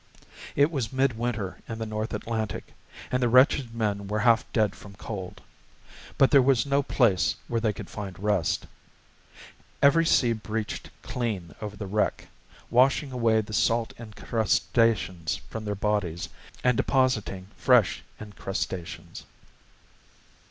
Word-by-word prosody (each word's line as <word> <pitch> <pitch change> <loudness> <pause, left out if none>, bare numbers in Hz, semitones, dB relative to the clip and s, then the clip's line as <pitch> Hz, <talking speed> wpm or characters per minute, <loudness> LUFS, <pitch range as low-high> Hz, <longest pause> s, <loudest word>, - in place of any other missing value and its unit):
It 145 +3 +4
was 135 -7 -2
midwinter 120 -6 -1
in 115 - -4
the 110 - -3
North 110 0 -3
Atlantic, 110 -2 -4 0.4
and 125 - +1
the 120 - +3
wretched 125 -1 +4
men 100 -3 -1
were 105 +1 -1
half 115 -2 +3
dead 105 -4 +1
from 100 -1 -13
cold. 95 -4 -7 0.8
But 135 - +5
there 140 - +7
was 130 -1 +3
no 140 0 +2
place 105 -8 +2
where 115 -1 -1
they 110 -2 +2
could 100 - -8
find 100 -3 -7
rest. 105 -4 0 1.1
Every 140 +4 +5
sea 120 -7 +4
breached 110 0 -4
clean 105 -9 -3
over 105 -1 -6
the 105 - -5
wreck, 105 +2 -1 0.4
washing 135 +3 +3
away 115 -3 +2
the 110 0 -9
salt 115 +1 +1
incrustations 110 -6 0 0.2
from 110 -1 -5
their 105 -1 -2
bodies 100 -4 -1 0.3
and 125 -1 +4
depositing 110 -8 +1
fresh 125 -7 +3 0.2
incrustations. 95 -4 -5
110 Hz, 130 wpm, -27 LUFS, 105-125 Hz, 1.1 s, there